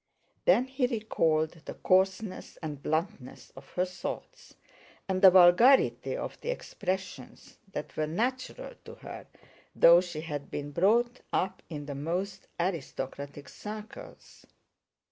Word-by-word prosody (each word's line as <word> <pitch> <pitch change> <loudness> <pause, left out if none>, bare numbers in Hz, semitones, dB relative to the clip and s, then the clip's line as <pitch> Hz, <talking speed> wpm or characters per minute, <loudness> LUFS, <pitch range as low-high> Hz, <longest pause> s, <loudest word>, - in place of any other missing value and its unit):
Then 255 - +5
he 260 -1 0
recalled 165 - +1
the - - -7
coarseness 190 +2 0
and 150 -3 -5
bluntness 155 -3 -3
of 135 +1 -13
her 180 - +1
thoughts 185 0 -7 0.5
and 185 -1 -1
the 190 - +10
vulgarity 185 +9 +5
of - - -6
the - - -5
expressions 190 - -5
that 150 0 -6
were 155 - -1
natural 255 - -3
to - - -10
her, - - -10 0.5
though 170 +1 +8
she 175 -4 -6
had 145 -3 -5
been 145 0 -5
brought 235 - +2
up 185 - -1
in 150 -3 -6
the 145 - -5
most 180 +7 -3
aristocratic 145 -4 -4
circles. 215 +1 -10
185 Hz, 125 wpm, -29 LUFS, 155-215 Hz, 0.5 s, the